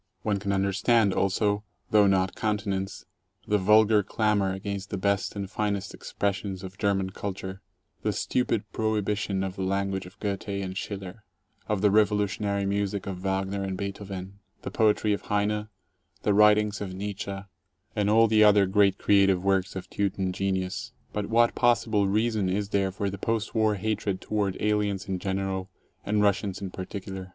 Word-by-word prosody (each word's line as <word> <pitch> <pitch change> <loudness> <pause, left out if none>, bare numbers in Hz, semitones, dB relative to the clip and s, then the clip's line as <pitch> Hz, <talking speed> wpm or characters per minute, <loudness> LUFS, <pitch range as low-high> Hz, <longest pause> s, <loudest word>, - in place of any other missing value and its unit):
One 100 -2 0
can 100 0 -2
understand 100 +2 +2
also, 105 +1 +1 0.3
though 105 -2 +6
not 95 -1 +2
countenance, 100 -3 -2 0.4
the 105 0 +2
vulgar 105 +2 +5
clamor 105 -1 +1
against 100 +1 -4
the 100 - -3
best 100 +2 0
and 100 -1 -3
finest 100 -1 -2
expressions 100 -1 -3
of 95 +1 -9
German 95 -2 +1
culture, 95 -1 -6 0.4
the - - 0
stupid 115 -4 0
prohibition 105 -3 -1
of 95 0 -4
the - - -3
language 95 0 -1
of 90 - -17
Goethe 100 0 -3
and 100 -2 -3
Schiller, 100 +1 -6 0.4
of 105 -3 0
the 105 -1 +4
revolutionary 105 -1 +1
music 100 0 -1
14 100 - -4
of - - -12
Wagner 95 +1 -1
and 95 -1 -3
Beethoven, 100 -1 -6 0.2
the - - -5
poetry 105 -1 +2
of 100 - -2
Heine, 105 +1 0 0.6
the 105 - +3
writings 105 0 +4
of 95 -2 -5
Nietzsche, 100 0 -4 0.6
and 105 -1 +1
all 115 +2 +6
the 110 0 +5
other 105 -1 +6
great 100 0 +3
creative 100 -3 +3
works 95 -1 +1
of 95 - -5
Teuton 95 -2 -1
genius* 95 -1 -2 0.2
But 105 -1 -2
what 115 +1 +3
possible 115 -4 +2
reason 105 -1 +1
is 100 +2 -1
there 100 -2 +1
for 100 +1 -2
the 100 - -7
post 115 +1 -1
war 110 -2 +2
hatred 100 -1 -2
toward 100 -3 -1
aliens 105 -2 0
in 95 -1 -2
general 95 0 -2 0.3
and 105 0 +1
Russians 100 -1 +1
in 95 -2 -5
particular? 95 0 -6
100 Hz, 165 wpm, -27 LUFS, 95-105 Hz, 0.6 s, though